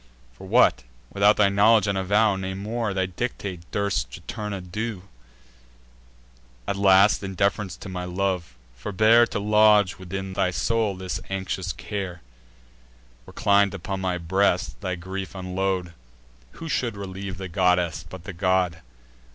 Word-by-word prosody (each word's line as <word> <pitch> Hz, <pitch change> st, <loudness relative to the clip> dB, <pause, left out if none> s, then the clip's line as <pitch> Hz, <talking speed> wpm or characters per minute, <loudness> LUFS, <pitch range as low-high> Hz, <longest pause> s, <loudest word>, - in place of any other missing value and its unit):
For -, -, -12 dB
what, -, -, +4 dB, 0.3 s
without 100 Hz, +1 st, +4 dB
thy 100 Hz, -2 st, +5 dB
knowledge 105 Hz, +2 st, +4 dB
and 100 Hz, -1 st, 0 dB
avow, 100 Hz, +2 st, +2 dB
Nay 95 Hz, 0 st, -4 dB
more, 110 Hz, +2 st, -3 dB
thy 95 Hz, -1 st, 0 dB
dictate, 95 Hz, -1 st, -4 dB
durst 100 Hz, -12 st, -1 dB
Juturna 105 Hz, -, -6 dB
do? 95 Hz, +2 st, -5 dB, 1.6 s
At -, -, -1 dB
last, 100 Hz, +1 st, +5 dB
in 95 Hz, -1 st, -6 dB
deference 100 Hz, 0 st, 0 dB
to -, -, -9 dB
my 90 Hz, -1 st, -5 dB
love, 90 Hz, -6 st, -2 dB, 0.2 s
forbear 110 Hz, -, +4 dB
To -, -, -4 dB
lodge 105 Hz, -2 st, +4 dB
within 95 Hz, +1 st, -5 dB
thy 90 Hz, -, +1 dB
soul 110 Hz, +2 st, 0 dB
this 95 Hz, 0 st, -4 dB
anxious 95 Hz, -1 st, -3 dB
care; 90 Hz, -, -6 dB, 1.0 s
Reclin'd 100 Hz, -2 st, +2 dB
upon 95 Hz, +1 st, -4 dB
my 90 Hz, -1 st, -1 dB
breast, 90 Hz, +3 st, 0 dB
thy 95 Hz, -3 st, -2 dB
grief 95 Hz, +2 st, -6 dB
unload: 95 Hz, -1 st, -2 dB, 0.6 s
Who 165 Hz, -, -8 dB
should 120 Hz, -8 st, -1 dB
relieve 95 Hz, -1 st, -6 dB
the 95 Hz, 0 st, -5 dB
goddess, 90 Hz, -1 st, +1 dB
but 95 Hz, -2 st, -9 dB
the 95 Hz, 0 st, -7 dB
god? 90 Hz, -2 st, +1 dB
95 Hz, 140 wpm, -24 LUFS, 90-100 Hz, 1.6 s, thy